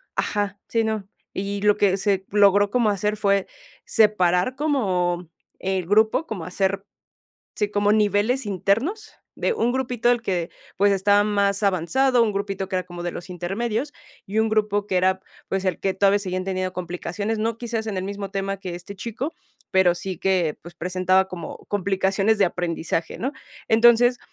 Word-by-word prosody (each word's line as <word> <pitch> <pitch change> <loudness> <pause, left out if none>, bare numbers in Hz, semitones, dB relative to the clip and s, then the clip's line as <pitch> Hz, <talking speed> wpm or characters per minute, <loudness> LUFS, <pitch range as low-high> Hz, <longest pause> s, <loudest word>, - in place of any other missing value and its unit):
ajá, 205 -1 -1
sí, 230 -1 +1
no. 220 -3 -2 0.3
Y 200 +1 -3
lo 210 0 +4
que 200 -2 +3
se 195 -1 0
logró 205 0 +5
como 240 -3 +3
hacer 210 +1 0
fue 200 -2 +1 0.4
separar 200 0 +3
como 180 - 0 0.3
el 190 -1 -1
grupo, 220 +9 +3
como 190 -7 -5
hacer 195 +2 -1 0.7
sí, 210 -1 -1
como 205 0 +2
niveles 215 +4 +2
internos, 215 - -1 0.2
de - - 0
un 245 - 0
grupito 245 -2 0
el 245 -1 +2
que, 175 -6 -2 0.3
pues, 200 +1 +4
estaba 205 +1 +3
más 200 -1 +1
avanzado, 235 +8 +2
un 220 -2 +1
grupito 195 -1 -3
que 190 - -2
era 185 - -1
como 175 -1 -8
de 175 0 -3
los 175 - -8
intermedios, 215 - -2 0.3
y 205 +3 -2
un 220 0 +3
grupo 210 -1 +1
que 190 - -1
era, 185 +1 +2 0.3
pues, 195 0 -2
el 185 - 0
que 195 - 0
todavía 200 +1 +3
seguían 185 -2 -3
teniendo 185 -1 -2
complicaciones, 180 +4 -3
no 225 +1 -1
quizás 230 -2 -3
en 210 -3 -3
el 185 - -3
mismo 200 0 -5
tema 195 0 -2
que 185 -2 -6
este 185 +3 -9
chico, 235 - -4 0.4
pero 190 -2 +4
sí 180 0 -5
que, 185 -6 +1
pues, 170 +1 -12
presentaba 185 +2 +1
como 180 -2 -7
complicaciones 195 +2 +1
de 195 - +5
aprendizaje, 170 -2 -3
¿no? 265 +4 -2 0.4
Entonces, 240 +2 +5
200 Hz, 175 wpm, -23 LUFS, 185-220 Hz, 0.7 s, logró